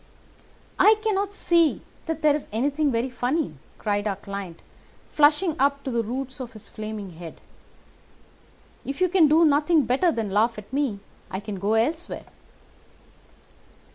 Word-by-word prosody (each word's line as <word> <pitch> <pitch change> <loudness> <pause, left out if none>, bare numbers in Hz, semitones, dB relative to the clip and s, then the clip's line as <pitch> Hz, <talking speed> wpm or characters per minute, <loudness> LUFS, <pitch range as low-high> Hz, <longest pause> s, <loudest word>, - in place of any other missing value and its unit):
"I 435 - +7
cannot 405 -2 0
see 340 -5 +2 0.3
that 320 -1 -3
there 300 -1 +5
is 295 - -4
anything 285 +6 +1
very 240 +2 -1
funny," 255 - -1 0.2
cried 205 -1 -1
our 200 - -1
client, 195 -3 -8 0.5
flushing 305 +3 +3
up 280 +1 +2
to 265 - -3
the 235 -1 +1
roots 260 +4 -5
of 250 -3 -7
his 215 -1 -11
flaming 215 -3 -6
head. 165 0 -10 1.4
"If 275 +3 -5
you 365 -1 +3
can 345 -3 +5
do 320 +3 +5
nothing 300 +1 +3
better 275 +8 +2
than 225 -7 -3
laugh 225 +3 +2
at 210 +3 -11
me, 265 -8 -1 0.3
I 190 - -4
can 205 -1 -6
go 205 +4 +1
elsewhere." 310 +10 -1
265 Hz, 150 wpm, -25 LUFS, 215-310 Hz, 1.4 s, I